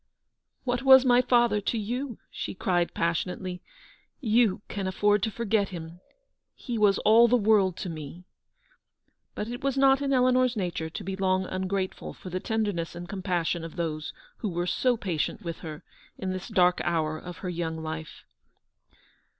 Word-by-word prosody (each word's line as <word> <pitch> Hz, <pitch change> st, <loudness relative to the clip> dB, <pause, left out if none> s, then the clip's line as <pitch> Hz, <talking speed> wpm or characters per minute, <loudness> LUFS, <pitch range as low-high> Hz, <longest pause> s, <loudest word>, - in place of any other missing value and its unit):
"What 245 Hz, -1 st, -1 dB
was 265 Hz, -1 st, +8 dB
my 245 Hz, -1 st, +5 dB
father 240 Hz, -4 st, +3 dB
to 230 Hz, -, -1 dB
you?" 240 Hz, +3 st, -3 dB
she -, -, -5 dB
cried, 175 Hz, -2 st, 0 dB
passionately. 180 Hz, +2 st, -2 dB, 0.6 s
"You 220 Hz, -5 st, +2 dB
can 195 Hz, -2 st, -3 dB
afford 205 Hz, +2 st, +2 dB
to 220 Hz, -, 0 dB
forget 215 Hz, -2 st, 0 dB
him. 170 Hz, -1 st, -8 dB, 0.6 s
He 245 Hz, -, -5 dB
was 205 Hz, -2 st, +4 dB
all 230 Hz, +2 st, +7 dB
the 245 Hz, +1 st, +4 dB
world 205 Hz, -5 st, +3 dB
to -, -, -4 dB
me! 160 Hz, +2 st, -8 dB, 0.6 s
" -, -, -49 dB
But 210 Hz, -, -3 dB
it 245 Hz, +2 st, -6 dB
was 275 Hz, -1 st, 0 dB
not 270 Hz, 0 st, +5 dB
in 280 Hz, -1 st, 0 dB
Eleanor's 255 Hz, -2 st, +3 dB
nature 175 Hz, -4 st, -2 dB
to -, -, -7 dB
be 190 Hz, +1 st, -4 dB
long 190 Hz, -1 st, +1 dB
ungrateful 185 Hz, +1 st, -3 dB
for 185 Hz, -, -10 dB
the 185 Hz, -, -2 dB
tenderness 205 Hz, -7 st, -2 dB
and 175 Hz, 0 st, -7 dB
compassion 180 Hz, -4 st, -1 dB
of 165 Hz, -, -7 dB
160 -, -, -16 dB, 0.4 s
those -, -, -26 dB, 0.2 s
who 215 Hz, -, -3 dB
were 175 Hz, 0 st, -2 dB
so 245 Hz, +7 st, +1 dB
patient 180 Hz, -8 st, -2 dB
with 170 Hz, -2 st, -5 dB
her 155 Hz, 0 st, -8 dB, 0.3 s
in 190 Hz, -1 st, -3 dB
this 185 Hz, 0 st, -5 dB
dark 180 Hz, -1 st, +3 dB
hour 155 Hz, -2 st, 0 dB
of 180 Hz, -1 st, -9 dB
her -, -, -1 dB
young 160 Hz, -2 st, -3 dB
life. 160 Hz, 0 st, -6 dB
190 Hz, 175 wpm, -27 LUFS, 175-235 Hz, 0.6 s, was